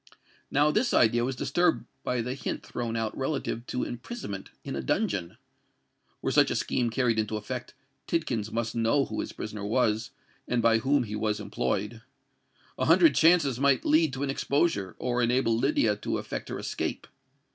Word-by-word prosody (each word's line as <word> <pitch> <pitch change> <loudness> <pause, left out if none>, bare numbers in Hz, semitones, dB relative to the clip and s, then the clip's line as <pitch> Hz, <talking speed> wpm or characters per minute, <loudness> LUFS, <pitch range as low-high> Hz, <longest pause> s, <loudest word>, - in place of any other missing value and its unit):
Now 145 +2 +3
this 240 +8 +1
idea 120 +1 +4
was 130 +2 -1
disturbed 175 +7 +1 0.2
by 125 -2 -1
the 125 +2 -3
hint 135 - -4
thrown 120 -2 -4
out 110 -1 -2
relative 135 -3 -3
to 125 - -2
imprisonment 120 - -6
in - - -5
a 70 - -2
dungeon. 85 +7 -1 0.9
Were - - 0
such - - +4
a - - -1
scheme 120 -2 0
carried 115 -1 +1
into 110 0 -1
effect, 125 +3 -6 0.3
Tidkins 115 -10 -1
must 115 0 -2
know 115 +5 +2
who - - -5
his - - -3
prisoner 105 -1 -6
was, 110 0 +1 0.4
and 125 - +1
by 115 -1 +4
whom 135 +2 +2
he 105 -2 -5
was 105 0 -1
employed. 105 +1 -2 0.8
A - - +1
hundred 330 - +6
chances 160 -7 +4
might 140 -2 +3
lead 155 0 +4
to 135 +2 -3
an 140 - 0
exposure, 135 - 0
or 125 0 -1
enable 120 -1 +2
Lydia 115 -3 +2
to - - -2
effect - - -5
her - - -4
escape. - - -3
120 Hz, 175 wpm, -28 LUFS, 110-135 Hz, 0.9 s, hundred